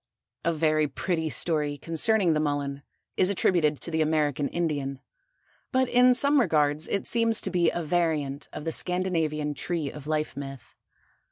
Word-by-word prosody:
A 170 - +1
very 155 -1 +1
pretty 160 +3 -2
story 150 +1 0
concerning 170 +4 +2
the 155 - +1
Mullen 145 -2 -2 0.4
is 185 - +3
attributed 170 -6 +1
to 170 - -3
the 160 0 0
American 150 -2 +1
Indian, 145 -5 -2 0.7
but 260 -1 +2
in 250 +1 +5
some 280 +3 +4
regards 150 -6 +2
it 200 - -2
seems 230 -1 +2
to - - -4
be 175 -2 +3
a 170 - -3
variant 155 -4 -1
of 150 - -8
the 165 - -1
Scandinavian 160 -5 -1
Tree 160 -2 -3
of 150 -1 -10
Life 155 -2 -1
myth. 135 -3 -9
155 Hz, 160 wpm, -26 LUFS, 145-175 Hz, 0.7 s, in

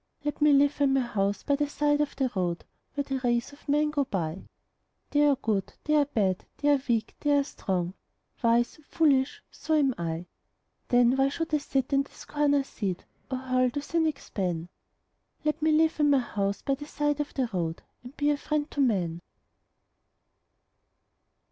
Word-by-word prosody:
Let 295 0 -3
me 300 0 +6
live 285 +1 +4
in 275 -1 +4
my 270 - +3
house 200 -4 -1
by 285 - +2
the 295 0 0
side 295 0 +1
of 295 - -2
the 265 -3 0
road, 175 -2 -1 0.3
Where 285 - 0
the 270 -1 -3
race 240 +2 0
of 285 - -15
men 300 +1 +3
go 290 -2 +1
by 175 -5 -3 0.6
They 295 0 +4
are 285 - +4
good, 215 -7 -2
they 300 - 0
are 295 -1 +5
bad, 200 -9 0
they 290 - +1
are 285 -2 +4
weak, 230 -1 +1
they 290 -1 +3
are 280 - +3
strong, 185 -9 -3 0.5
Wise, 235 +3 +2
foolish 285 -5 +2
so 315 - -1
am 280 -4 +3
I. 165 0 -3 0.6
Then 245 +1 +4
why 270 0 +3
should 325 +3 -4
I 300 - +4
sit 270 -1 -1
in 275 - +5
the 275 - -8
scorner's 285 -2 0
seat, 195 -8 -4 0.2
Or 260 - -1
hurl 255 -1 +1
the 285 +4 -4
cynic's 320 -2 -1
ban? 175 -4 -2 0.8
Let 305 +1 0
me 315 +1 +3
live 315 +1 +3
in 295 -1 +4
my 280 - +5
house 200 -5 -2
by 275 - +1
the 290 +2 -6
side 295 -1 -1
of 295 - -3
the 260 -3 +1
road 165 -3 -2 0.2
And 250 +3 -12
be 290 0 +2
a 290 - 0
friend 300 0 -2
to 285 - -1
man. 180 -9 +1
275 Hz, 190 wpm, -28 LUFS, 220-290 Hz, 0.8 s, me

